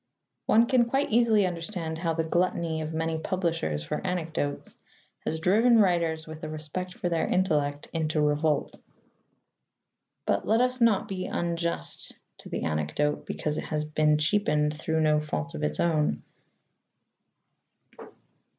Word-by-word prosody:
One 230 +2 +5
can 245 -1 +3
quite 270 +3 0
easily 220 -3 +4
understand 165 -2 -4
how 165 -1 -1
the 165 - 0
gluttony 170 -1 0
of 155 0 -4
many 160 0 -1
publishers 165 - -1
for - - -3
anecdotes 165 -6 -3 0.5
has 160 - -1
driven 225 +8 +4
writers 170 -5 +2
with 155 0 -10
a 155 - -4
respect 155 +4 -5
for - - -2
their 170 -2 0
intellect 150 -6 0
into 155 -1 0
revolt. 150 0 +1 1.4
But - - 0
let 220 +1 +4
us 250 0 +1
not 230 -4 +4
be 185 -1 -4
unjust 170 0 -3 0.2
to - - -10
the - - -3
anecdote 80 - -1
because 150 0 -2
it - - -5
has 150 -1 -1
been 150 0 +2
cheapened 150 -3 +1
through 160 +1 -1
no 155 -1 +3
fault 75 - -4
of 75 - -5
its 75 0 -1
own. 150 - +1
160 Hz, 140 wpm, -27 LUFS, 150-185 Hz, 1.4 s, One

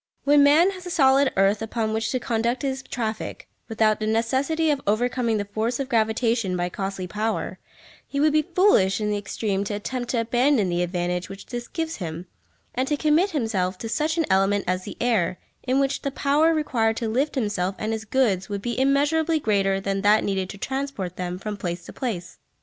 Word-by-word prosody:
When 290 0 +5
man 305 +7 +5
has 370 -2 -9
the - - -5
solid 275 -4 +4
earth 195 +2 +3
upon 225 0 -2
which 220 0 -1
to 255 - -1
conduct 235 +2 -1
his 265 -1 -2
traffic, 225 -4 -4 0.2
without 220 -1 +2
the 215 - -2
necessity 270 +8 +1
of 285 -2 -1
overcoming 235 +1 +1
the 205 - -2
force 220 +5 -2
of 270 -1 -3
gravitation 225 -4 +1
by 175 0 -1
costly 195 0 -4
power, 215 +5 -3 0.5
he 280 - -3
would 300 +1 +3
be 310 - +4
foolish 335 - +3
in 210 -1 -1
the 205 - 0
extreme 200 -1 -2
to 205 - -3
attempt 245 +4 -4
to 240 - +1
abandon 240 -2 +2
the 175 0 0
advantage 175 0 -2
which 195 0 -9
this 240 -1 -6
gives 325 -1 -3
him, 170 -1 -5 0.5
and 255 +2 -1
to 295 - 0
commit 310 +6 +3
himself 210 - -1
to 225 - -6
such 315 +6 0
an 325 - +2
element 195 +1 +2
as 185 +1 -1
the - - -8
air, 210 -7 +1 0.2
in 260 +1 +1
which 275 0 0
the 280 - -1
power 285 +4 +2
required 235 -8 +1
to 230 - -2
lift 270 +8 0
himself 205 -6 -1
and 220 +1 -2
his 220 0 -4
goods 215 -5 +1
would 200 -1 -4
be 240 0 -2
immeasurably 295 +4 +2
greater 195 -5 +1
than 195 0 -2
that 210 +2 +4
needed 190 -2 -1
to 200 - -8
transport 265 -7 -4
them 180 0 -4
from 210 +2 -5
place 175 -3 -5
to - - -10
place. 190 -9 -5
225 Hz, 205 wpm, -24 LUFS, 195-275 Hz, 0.5 s, When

